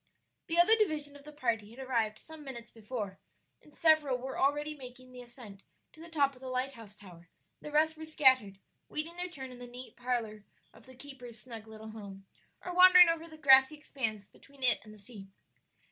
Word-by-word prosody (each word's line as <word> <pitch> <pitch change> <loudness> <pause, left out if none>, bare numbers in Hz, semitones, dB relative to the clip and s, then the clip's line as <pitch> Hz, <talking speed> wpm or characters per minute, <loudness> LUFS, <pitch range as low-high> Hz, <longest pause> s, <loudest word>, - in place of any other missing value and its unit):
The 335 -1 0
other 355 +6 +7
division 310 -9 -1
of 285 0 -15
the 300 - -10
party 235 -7 -2
had 230 - -15
arrived 230 -5 -1
some 315 +3 -13
minutes 240 -5 -8
before, 210 -3 -6 0.4
and 300 - -20
several 305 -4 +3
were 265 +2 -6
already 295 +2 +1
making 255 -2 -12
the 250 0 -10
ascent 235 -5 -12 0.3
to 315 - -15
the 335 - -11
top 285 -4 +1
of 255 - -19
the 260 - -8
lighthouse 255 -5 -4
tower; 175 -5 -15 0.3
the 300 - -9
rest 315 +1 +2
were 315 0 -9
scattered, 260 -10 +3 0.3
waiting 315 +3 -5
their 360 0 -3
turn 265 -6 -8
in 250 - -12
the 245 - -9
neat 250 +1 -10
parlor 235 -4 -3 0.3
of - - -19
the 260 - -14
keeper's 250 -3 -11
snug 225 -3 -10
little 220 0 -10
home, 200 -3 -10 0.4
or 360 - -4
wandering 360 -1 +9
over 330 0 -2
the 315 -1 -13
grassy 270 0 +6
expanse 225 -8 -4
between 275 +6 -14
it 250 - +5
and 215 - -13
the 215 - -14
sea. 205 -1 -12
260 Hz, 200 wpm, -31 LUFS, 225-300 Hz, 0.4 s, wandering